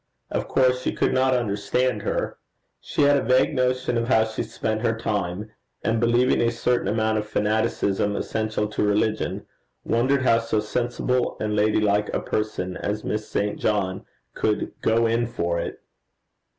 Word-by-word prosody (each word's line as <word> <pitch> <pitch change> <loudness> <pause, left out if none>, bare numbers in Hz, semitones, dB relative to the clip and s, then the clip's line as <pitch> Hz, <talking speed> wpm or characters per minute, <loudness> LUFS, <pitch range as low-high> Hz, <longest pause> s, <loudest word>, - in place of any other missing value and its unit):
Of - - -2
course 125 -1 +2
she - - -1
could - - +1
not 130 0 +3
understand 105 +1 0
her. - - -2 0.4
She - - -1
had 145 0 +5
a - - +1
vague 130 +3 +3
notion 125 -2 +1
of 115 - -2
how 110 -3 +4
she 110 0 -4
spent 110 0 -3
her 115 -1 0
time; 105 -1 -3 0.3
and 115 0 +1
believing 120 +2 +3
a 115 - +3
certain 120 +1 0
amount 110 0 +1
of 105 - -5
fanaticism 105 -1 0
essential 110 -1 -1
to 105 - -1
religion, 105 +1 0 0.4
wondered 130 +3 +1
how 115 -2 +4
so 115 -2 -1
sensible 120 +3 -1
and 105 -1 -1
ladylike 105 -1 +2
a - - +1
person 105 -4 -3
as 105 +1 -3
Miss 105 0 -3
St. 105 0 -1
John 100 -3 0 0.3
could 105 -1 -1
go 115 +1 +3
in 115 +1 +1
for 85 -7 -1
it. - - -5
110 Hz, 165 wpm, -24 LUFS, 105-120 Hz, 0.4 s, had